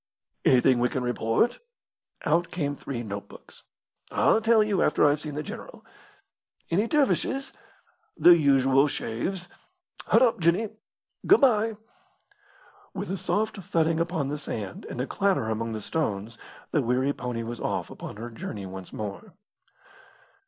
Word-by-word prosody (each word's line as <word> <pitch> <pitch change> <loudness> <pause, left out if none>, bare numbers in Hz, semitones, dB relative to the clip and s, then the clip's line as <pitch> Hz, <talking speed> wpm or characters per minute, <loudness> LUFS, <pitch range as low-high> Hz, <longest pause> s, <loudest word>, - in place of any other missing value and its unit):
"Anything 125 -1 +5
we 125 +1 +2
can 130 - -2
report?" 120 - +1 0.7
Out 165 +3 +2
came 145 -5 -2
three 125 -4 -5
notebooks. 100 -1 -9 0.5
"I'll 220 - +3
tell 225 -1 +5
you 210 -3 0
after 150 - +3
I've 145 0 +3
seen 150 -2 -6
the 150 - -3
general." - - -9 0.9
"Any 200 +7 +2
dervishes?" 275 -1 +1 0.6
"The 175 - +8
usual 135 -2 +4
shaves. 175 +9 -3 0.6
Hud - - +5
up, 235 -5 +2
Jinny! 175 +6 +2 0.6
Good 400 - +6
bye!" 225 -4 +3 1.2
With - - -4
a - - -1
soft 210 +4 -1
thudding 165 -3 0
upon 165 -4 -1
the 150 +1 -3
sand, 105 -8 -6
and - - -6
a 125 - 0
clatter 185 - 0
among 115 +1 -2
the 110 - -4
stones 115 -6 -3 0.3
the 150 - +2
weary 130 +3 +1
pony 125 -3 -4
was 120 +1 -6
off - - -2
upon - - -8
her 115 +3 -7
journey 105 -3 -6
once 95 0 -8
more. 110 - -7
145 Hz, 145 wpm, -26 LUFS, 120-190 Hz, 1.2 s, The